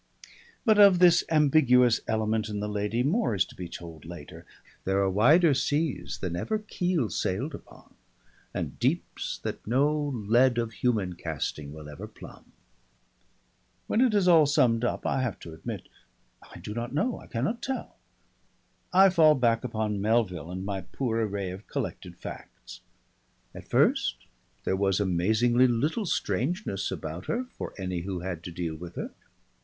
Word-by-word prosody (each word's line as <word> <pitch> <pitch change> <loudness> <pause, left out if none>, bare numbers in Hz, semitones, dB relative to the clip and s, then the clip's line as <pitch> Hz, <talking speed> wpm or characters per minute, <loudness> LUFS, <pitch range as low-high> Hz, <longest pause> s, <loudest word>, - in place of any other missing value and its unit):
But 215 -3 +5
of 200 -3 +8
this 175 -1 +6
ambiguous 135 -6 +4
element 110 0 0
in 105 -1 -3
the 105 - -2
lady, 105 +3 -1
more 165 - +1
is 95 - +2
to - - -15
be 90 -2 -7
told 85 -2 -9
later. 85 -3 -10 0.4
There 95 +1 0
are 100 -1 +2
wider 150 - +5
seas 145 +2 -1
than 90 -3 -4
ever 215 - -1
keel 180 - -1
sailed 130 +12 -2
upon, - - -13 0.6
and - - -5
deeps - - -1
that - - -5
no 140 +6 +2
lead 120 -1 +2
of 115 -1 -1
human 105 -5 0
casting 75 -3 -4
will 75 0 -10
ever 75 -1 -8
plumb. - - -14 1.3
When 225 - +1
it 245 -5 +3
is 195 -3 +3
all 165 -4 +6
summed 125 -6 +3
up, 120 - -1
I 135 - +1
have 125 -6 -2
to 85 - -9
admit, 80 - -7 0.5
I - - -14
do 105 - -7
not 120 +4 -4
know, 235 +11 0
I - - -14
cannot 140 - -2
tell. 265 -1 -4 1.0
I 190 +1 +7
fall 160 -4 +6
back 120 -3 +2
upon 110 -4 -2
Melville 100 -7 0
and 95 +1 -5
my 100 -1 -3
poor 115 +4 -2
array 100 -3 -3
of 95 +3 -10
collected - - -5
facts. - - -10 0.7
At - - -11
first - - +2 0.5
there 95 - 0
was 95 0 +1
amazingly 110 +7 +3
little 150 - 0
strangeness 120 - -1
about 80 -1 -6
her 245 +2 -1
for - - -6
any 90 -2 -3
who 90 0 -4
had 90 -3 -4
to 90 - -5
deal 85 -1 -3
with 85 +2 -9
her. - - -5
115 Hz, 160 wpm, -27 LUFS, 95-145 Hz, 1.3 s, of